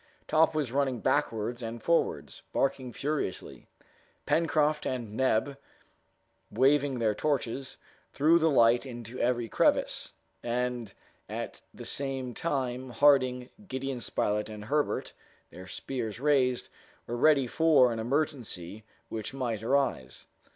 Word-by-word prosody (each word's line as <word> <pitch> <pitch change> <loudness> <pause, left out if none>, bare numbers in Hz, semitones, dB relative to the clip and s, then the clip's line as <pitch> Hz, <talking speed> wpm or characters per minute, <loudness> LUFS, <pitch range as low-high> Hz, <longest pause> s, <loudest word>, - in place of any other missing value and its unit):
Top 160 0 +3
was 145 -6 -1
running 135 -2 0
backwards 120 -3 0
and 115 0 -6
forwards, 170 0 0
barking 135 -2 0
furiously. 145 -4 -4 0.6
Pencroft 155 -2 +2
and 120 -5 -4
Neb, 130 +3 +1 0.9
waving 135 +3 +3
their 110 -3 +1
torches, 135 0 -2 0.3
threw 160 +4 +4
the 160 0 +3
light 120 -4 +5
into 120 -2 -8
every 120 -1 +1
crevice; - - +1 0.3
and 120 -2 -2 0.3
at - - -5
the - - -10
same 135 -3 -2
time, 130 -4 -2
Harding, 130 -1 +3 0.2
Gideon 130 -2 -3
Spilett, 105 -1 -1
and 105 -1 -8
Herbert, 145 +5 -1 0.4
their 90 +1 -10
spears 115 +1 -5
raised, 130 -3 +2 0.4
were 120 - -4
ready 140 +1 +4
for 145 -2 +4
any 115 -1 -3
emergency 115 - -2 0.3
which 110 +3 -5
might 120 -5 -2
arise. 120 - -1
130 Hz, 120 wpm, -29 LUFS, 115-140 Hz, 0.9 s, light